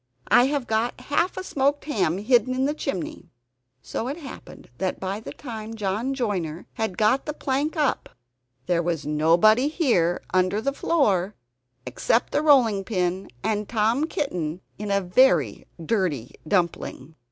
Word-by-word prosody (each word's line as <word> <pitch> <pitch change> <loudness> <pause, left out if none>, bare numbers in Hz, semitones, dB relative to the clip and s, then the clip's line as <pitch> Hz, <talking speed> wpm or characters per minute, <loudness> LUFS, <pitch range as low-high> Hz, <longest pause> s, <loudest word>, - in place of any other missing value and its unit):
"I 245 - +6
have 280 -1 -1
got 225 +2 -1
half 290 +8 0
a 375 - -3
smoked 285 -3 0
ham 195 - 0
hidden 245 +4 +2
in 260 +1 +1
the 290 - +1
chimney." 180 - -5 0.5
So 225 - -4
it 280 +4 -3
happened 275 - -11
that 190 -1 -2
by 195 +2 -3
the 220 - -8
time 225 -4 -7
John 220 +6 -2
Joiner 185 - -2
had 220 -5 -3
got 220 +7 +2
the 300 - -3
plank 290 +4 -1
up 295 -3 0 0.6
there 175 -1 +1
was 165 -3 -2
nobody 170 - +4
here 235 - +1
under 185 +2 +2
the 275 +5 -1
floor 210 - +1 0.5
except 180 - 0
the - - +1
rolling 245 -10 +4
pin 185 -2 -2
and 210 -1 -1
Tom 230 +6 +2
Kitten 180 - -3 0.2
in 210 0 -4
a 200 0 +2
very 180 - +3
dirty 165 - -1
dumpling! 165 -5 -1
215 Hz, 150 wpm, -24 LUFS, 180-265 Hz, 0.6 s, I